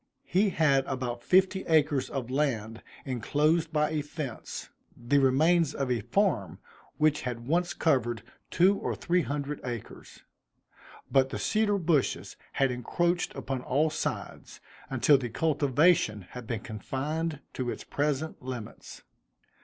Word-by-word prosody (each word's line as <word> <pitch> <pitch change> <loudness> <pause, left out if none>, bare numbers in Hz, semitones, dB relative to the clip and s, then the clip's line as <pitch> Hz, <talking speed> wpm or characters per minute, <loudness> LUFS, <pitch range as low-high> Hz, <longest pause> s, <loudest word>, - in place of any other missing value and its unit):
He 200 +3 +2
had 150 -6 +3
about 125 -3 -3
fifty 190 +6 +3
acres 150 -4 +2
of 130 -3 -4
land 115 -6 -1 0.2
enclosed 150 +6 +1
by 150 -1 +1
a 155 -1 0
fence, 145 -4 -6 0.3
the 125 +4 +2
remains 155 +4 +3
of 135 -3 -1
a 120 -3 +1
farm 160 - 0 0.4
which 150 -1 +2
had 120 -2 -5
once 175 +5 0
covered 120 -7 +1 0.3
two 190 +3 +4
or - - -2
three 180 +1 +1
hundred 145 -1 -3
acres; 120 -3 -8 0.9
but 135 -1 +4
the - - -4
cedar 215 -2 +1
bushes 165 -6 0 0.2
had 135 -2 +2
encroached 170 +8 -1
upon 130 -1 -3
all 150 +5 +1
sides, - - -5 0.3
until 135 +2 +4
the 125 -2 -4
cultivation 145 - +2
had 125 -2 -8
been 115 -2 -3
confined 145 +8 -3
to 125 -2 -3
its - - -5
present 150 +2 -2
limits. 125 -4 -8
140 Hz, 135 wpm, -29 LUFS, 125-160 Hz, 0.9 s, two